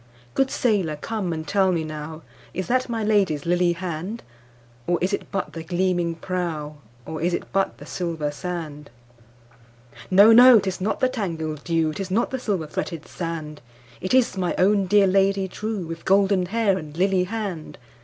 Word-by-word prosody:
Good 270 0 +2
sailor 200 -13 +1
come 190 +3 -3
and 160 -1 -4
tell 195 -2 +3
me 165 -3 0
nowIs 155 +1 -7
that 255 +5 0
my 225 -2 -2
Lady's 195 -9 +1
lily 175 0 +2
hand? 180 +5 -5 0.6
Or 175 - +2
is 185 +3 -1
it - - -3
but 195 -2 -3
the 165 - -6
gleaming 175 0 0
prow, 165 -4 -4 0.3
Or 160 -1 -5
is 175 +1 +1
it - - -7
but 195 +1 0
the - - -11
silver 165 -4 -3
sand? 150 -1 -6 1.2
No! 200 +4 +7
no! 245 +1 +9
'tis 190 -2 -3
not 210 +7 -1
the 255 - +5
tangled 165 - -4
dew,'Tis 165 +3 -1
not 225 +7 0
the 260 - -2
silver 200 -9 -1
fretted 155 +1 -5
sand, 160 -4 -5 0.4
It 185 +7 0
is 255 -5 +3
my 180 -2 -1
own 195 +1 +3
dear 205 +1 +5
Lady 195 0 +2
trueWith 185 -5 -5
golden 195 -1 +3
hair 205 -2 +1
and 155 0 -10
lily 185 0 +2
hand! 195 -6 -5
180 Hz, 165 wpm, -23 LUFS, 160-200 Hz, 1.2 s, no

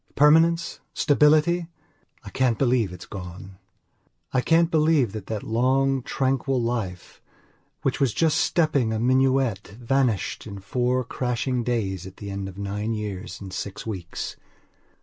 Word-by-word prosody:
Permanence? 165 +3 +4 0.2
Stability? 155 +4 +3 0.6
I - - -9
can't 125 -4 +1
believe 120 -7 +2
it's 90 -1 -9
gone. 95 0 -9 0.7
I 130 - +3
can't 165 +4 +3
believe 155 -7 +3
that 105 -2 -7
that 110 -2 -4
long, 130 +4 +2
tranquil 135 +1 0
life, 115 -7 -4 0.6
which - - 0
was 135 -4 +2
just 160 +6 +2
stepping 145 -9 +2
a 110 - -1
minuet, 130 -3 +2
vanished 125 -4 0
in 100 -2 -7
four 125 +6 0
crashing 125 0 -2
days 100 -7 -2
at 95 - -13
the 100 -1 -7
end 100 0 -4
of 95 - -12
nine 105 +3 -3
years 105 -3 -5
and 95 -2 -9
six 100 0 -5
weeks. 95 -6 -5
120 Hz, 140 wpm, -25 LUFS, 100-135 Hz, 0.7 s, Permanence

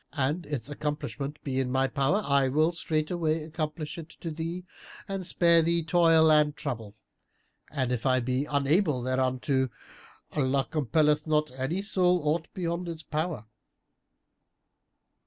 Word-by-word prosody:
An 150 +4 -1
its 135 -5 -3
accomplishment 145 -1 -4
be 135 -2 -1
in 130 -1 -1
my 130 +1 +2
power 140 +10 +1
I 140 -1 +3
will 155 +5 +2
straightway 160 -1 -1
accomplish 155 0 -4
it 165 0 -9
to 165 - -4
thee 165 +3 -5 0.4
and 195 -2 -3
spare 170 -1 +4
thee 170 +1 +1
toil 165 -1 +5
and 150 -1 +4
trouble; 115 -8 -5 0.7
and 130 -4 -1
if 125 -2 -1
I 130 -1 +3
be 130 +3 -1
unable 145 -1 +1
thereunto, 130 +1 0 0.6
Allah 135 -2 +1
compelleth 150 +1 +2
not 150 -1 +1
any 135 +9 -2
soul 180 -3 +3
aught 160 +2 0
beyond 170 -1 -2
its 160 -1 -6
power." 155 -7 -3
150 Hz, 140 wpm, -28 LUFS, 135-165 Hz, 0.7 s, toil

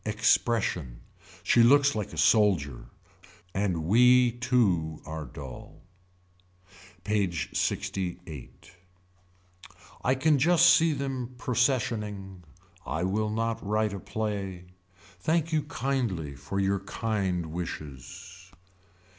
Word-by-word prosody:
Expression. 105 - 0 0.4
She 120 - +4
looks 140 +4 +5
like 105 -3 -3
the 80 - -10
soldier. 80 - +2 0.7
And 95 -5 -1
we 125 +6 +5
too 105 - +1
are 80 -1 -6
dull. 65 0 -10 1.2
PAGE 100 -6 -1
LXIII. 90 -7 -3 1.5
I 130 - +2
can 145 +2 +2
just 170 +4 +5
see 165 -1 +3
them 130 -3 -4
processioning. 110 -7 -1 0.4
I 80 - -3
will 105 +3 0
not 115 +1 -2
write 105 0 0
a 100 - -5
play. 100 -4 -4 0.5
Thank 160 - 0
you 155 - +3
kindly 115 - -2
for 75 +8 -4
your 100 0 +1
kind 95 -5 -2
wishes. 90 +3 -8
105 Hz, 100 wpm, -28 LUFS, 90-120 Hz, 1.5 s, looks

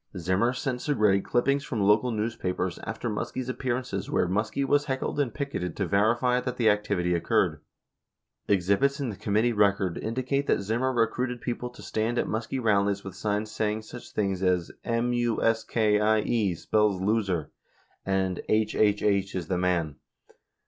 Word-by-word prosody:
15 95 - -6
Zimmer 95 +7 +2
sent 130 0 -3
Segretti 105 -9 +2
clippings 140 +3 +1
from 115 -8 -2
local 105 +5 +4
newspapers 105 -5 -2
after 115 +1 -4
Muskie's 120 +3 -3
appearances 130 -1 -3
where - - +1
Muskie 105 +8 -1
was 145 +2 +2
heckled 135 +1 -2
and 135 -5 +1
picketed 120 - -4
to 100 - 0
verify 115 +6 +2
that 125 0 -4
the 110 -3 +5
activity 100 -4 0
occurred. 85 - +1 0.9
16 100 - +5
Exhibits 100 - +1
in 135 -3 -2
the - - -7
Committee 110 +5 +1
record 100 -4 +2
indicate 130 +5 -1
that - - +2
Zimmer 115 +6 0
recruited 125 +1 0
people 125 0 -4
to 125 - -14
stand 115 +2 -1
at - - +1
Muskie 110 +4 -3
rallies 100 -3 +1
with 95 - -7
signs 105 0 -2
saying 110 0 -1
such 120 +2 -10
things 95 -3 -1
as 90 -2 +1
"M 120 +1 0
U 120 -2 0
S 115 0 +2
K 105 -2 +2
I 110 0 +3
E 105 -6 0
spells 105 +2 +1
Loser" 95 -6 0 0.5
and 95 -2 0
"HHH 105 -2 +2
is 85 -3 -4
the 90 - +1
Man." 85 -5 0
110 Hz, 170 wpm, -27 LUFS, 100-120 Hz, 0.9 s, the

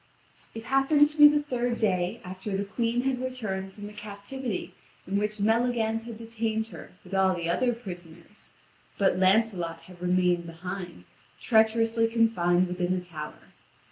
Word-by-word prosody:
It 225 - -6
happened 270 +3 +4
to 300 +1 -11
be 295 - +12
the 295 0 +2
third 245 -4 -1
day 190 +1 0
after 190 +2 -4
the 200 - -2
Queen 230 +4 0
had 260 -1 -1
returned 215 -7 -3
from 205 +1 -10
the 210 - -9
captivity 210 +2 -5 0.3
in 190 - -3
which 210 0 -2
Maleagant 225 +1 +1
had 230 -2 -7
detained 225 -1 -3
her - - -11
with 185 - -12
all 190 -1 +3
the 170 -1 -3
other 245 +9 +2
prisoners; 175 -3 -10 0.5
but 190 -2 +2
Lancelot 185 -4 +2
had 180 -1 -15
remained 180 -1 +2
behind, 175 - -7 0.3
treacherously 225 0 +3
confined 185 -6 +2
within 180 0 -1
a 185 - -1
tower. 160 -4 -9
210 Hz, 155 wpm, -27 LUFS, 180-230 Hz, 0.5 s, be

